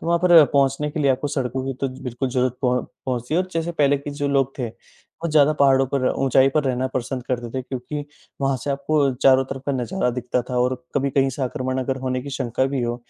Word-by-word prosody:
तो - - -7
वहाँ 170 0 +3
पर 175 -3 +8
पहुँचने 140 +1 +2
के 155 - -3
लिए 140 -2 +3
आपको 135 +3 0
सड़कों 130 -1 -2
की 135 - -1
तो 135 - 0
बिल्कुल 125 +1 -3
ज़रूरत 125 -1 0
प 125 0 +1 0.2
पहुँचती 125 +3 -2
है, 180 - +3
और 185 - -3
जैसे 165 +1 -2
पहले 145 -3 +3
के 140 - -7
जो 145 -1 -2
लोग 135 -1 +1
थे, 125 - -1
बहुत 165 +8 -10
ज़्यादा 150 -1 +5
पहाड़ों 135 -1 +5
पर 130 -2 +1
ऊँचाई 135 0 +3
पर 150 - +2
रहना 130 -1 0
पसंद 130 0 -3
करते 120 -2 -3
थे, 130 - -3
क्योंकि 135 +3 -5 0.4
वहाँ 135 -1 +1
से 145 - -1
आपको 140 0 +1
चारों 135 +1 +4
तरफ़ 135 0 -7
का 140 - +1
नजारा 130 +3 -1
दिखता 125 0 -2
था 125 - -2
और 125 +1 +2 0.2
कभी 140 0 +1
कहीं 135 0 +2
से 140 - -3
आक्रमण 130 +1 -2
अगर 130 +1 -2
होने 130 -1 -2
की 140 - -7
शंका 130 -2 -1
भी 135 -2 -2
हो, 120 0 -1
135 Hz, 245 wpm, -22 LUFS, 125-140 Hz, 0.4 s, पर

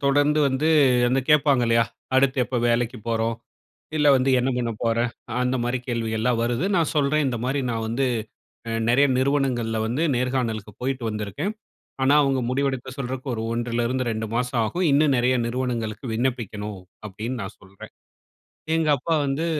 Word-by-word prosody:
தொடர்ந்து 145 +2 +3
வந்து 135 +4 0 0.4
அந்த 130 +2 +2
கேப்பாங்க 145 -4 +4
இல்லையா? 115 0 +4 0.3
அடுத்து 135 0 +3
எப்ப 125 +1 -3
வேலைக்கு 120 0 0
போறோம், 115 0 0 0.7
இல்ல 150 - +4
வந்து, 130 +1 +1
"என்ன 130 - 0
பண்ண 120 -2 -1
போற?" 115 0 +1 0.5
அந்த 125 +1 0
மாரி 125 +1 0
கேள்விகள்லாம் 115 0 0
வருது. 120 +7 0
நான் 165 - +1
சொல்றேன், 150 +1 +2
"இந்த 120 -3 -2
மாரி 135 +2 0
நான் 115 -1 -2
வந்து 125 +4 0 0.6
அ - - -2 0.2
நெறைய 135 +4 +4
நிறுவனங்கள்ல 130 -5 0
வந்து 125 +8 -1
நேர்காணலுக்கு 120 -4 -1
போய்ட்டு 130 -1 -2
வந்துருக்கேன். 105 - -3 0.5
ஆனா 135 +2 +4
அவங்க 135 -2 +1
முடிவெடுக்க 130 -1 -1
சொல்றக்கு 130 0 -5
ஒரு 110 - -3
1லிருந்து 120 +2 -1
2 110 0 -3
மாசம் 125 0 0
ஆகும். 175 +12 -1
இன்னும் 145 0 +4
நெறைய 125 +1 +2
நிறுவனங்களுக்கு 120 -2 -3
விண்ணப்பிக்கணும்." 110 -5 -3 0.3
அப்படின்னு 110 +6 -5
நான் 95 - -7
சொல்றேன். 95 +1 -13 0.8
எங்க 160 -2 +1
அப்பா 165 +6 -2
வந்து 140 +4 -1
125 Hz, 155 wpm, -24 LUFS, 115-135 Hz, 0.8 s, கேப்பாங்க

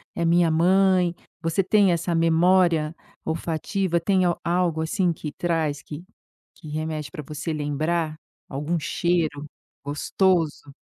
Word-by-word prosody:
é - - -3
a - - +2
minha 170 0 +4
mãe". 180 +1 +3 0.3
Você 165 +3 +1
tem 200 0 +4
essa 170 0 0
memória 165 -1 +3 0.3
olfativa? 170 +3 -1
Tem 190 +2 +2 0.2
algo 170 -2 +1
assim 175 +2 +1
que 150 -2 -6
traz, 160 -4 -1
que 155 +4 -9 0.6
remete 155 -1 -4
pra 150 - -6
você 150 +3 -5
lembrar? 155 +2 -1 0.3
Algum 150 +5 -2
cheiro 160 -2 -1 0.4
gostoso? 150 0 0
165 Hz, 120 wpm, -24 LUFS, 155-175 Hz, 0.6 s, minha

